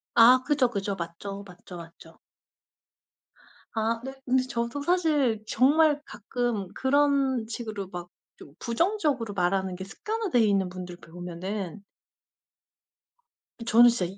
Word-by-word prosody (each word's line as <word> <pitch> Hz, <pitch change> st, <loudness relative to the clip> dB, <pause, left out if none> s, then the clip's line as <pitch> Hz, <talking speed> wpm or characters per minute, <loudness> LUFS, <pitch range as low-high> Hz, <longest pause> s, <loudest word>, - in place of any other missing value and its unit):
아 245 Hz, +2 st, +8 dB
그죠, 290 Hz, -4 st, +3 dB
그죠. 200 Hz, -3 st, -2 dB
맞죠, 195 Hz, +4 st, -6 dB
맞죠, 180 Hz, 0 st, -11 dB
맞죠. 165 Hz, -1 st, -13 dB, 1.6 s
아 225 Hz, +1 st, 0 dB
네 265 Hz, -, -5 dB
근데 255 Hz, 0 st, +3 dB
저도 235 Hz, +2 st, -3 dB
사실 295 Hz, -10 st, +2 dB
정말 295 Hz, +5 st, +4 dB
가끔 225 Hz, -3 st, -3 dB
그런 270 Hz, -3 st, +2 dB
식으로 220 Hz, -4 st, -5 dB
막 175 Hz, -1 st, -7 dB, 0.3 s
좀 140 Hz, -, -13 dB
부정적으로 280 Hz, -, 0 dB
말하는 190 Hz, 0 st, 0 dB
게 190 Hz, -, -6 dB
습관화돼 420 Hz, -, -2 dB
있는 200 Hz, -4 st, +3 dB
분들 180 Hz, -1 st, -7 dB
보면은 180 Hz, +3 st, -6 dB, 1.8 s
저는 240 Hz, +1 st, +7 dB
진짜 230 Hz, -6 st, 0 dB
이 190 Hz, +3 st, -7 dB
225 Hz, 235 characters per minute, -27 LUFS, 190-265 Hz, 1.8 s, 아